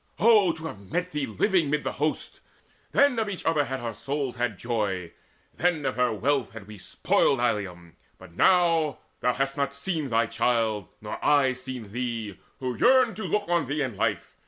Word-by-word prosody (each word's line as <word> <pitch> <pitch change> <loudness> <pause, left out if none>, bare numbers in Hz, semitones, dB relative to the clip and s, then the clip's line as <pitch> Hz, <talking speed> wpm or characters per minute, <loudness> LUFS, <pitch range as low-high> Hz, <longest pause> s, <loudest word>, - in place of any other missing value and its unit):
Oh 210 -5 +5
to 160 0 -9
have 100 -10 -9
met 180 +1 -1
thee 150 -2 -2
living 160 - +1
mid 150 0 0
the - - -2
host! 150 +2 -2 0.5
Then 280 -4 +4
of 220 -2 -1
each 195 - -6
other 155 -3 +2
had 135 -1 -4
our 115 -1 -4
souls 135 +3 -3
had 120 -4 -1
joy, 100 -7 -2 0.4
Then 170 -4 0
of - - -1
her 125 -1 +2
wealth 120 0 0
had 110 -3 -9
we 105 -1 -11
spoiled 135 +7 +1
Ilium. 95 -8 -2 0.2
But 95 -2 -14
now, 165 - +3 0.2
thou 125 - +1
hast 135 +1 -1
not 140 0 -1
seen 155 -1 -2
thy 115 0 +2
child, 110 -4 0
nor 105 - -6
I 140 -3 +4
Seen 130 -5 -8
thee, 115 -4 -4 0.2
who 125 -2 -3
yearned 255 - +4
to 215 - -4
look 210 -1 -1
on 170 -5 +1
thee 145 +2 -1
in 125 -5 -4
life. - - -1
135 Hz, 190 wpm, -26 LUFS, 115-160 Hz, 0.5 s, Oh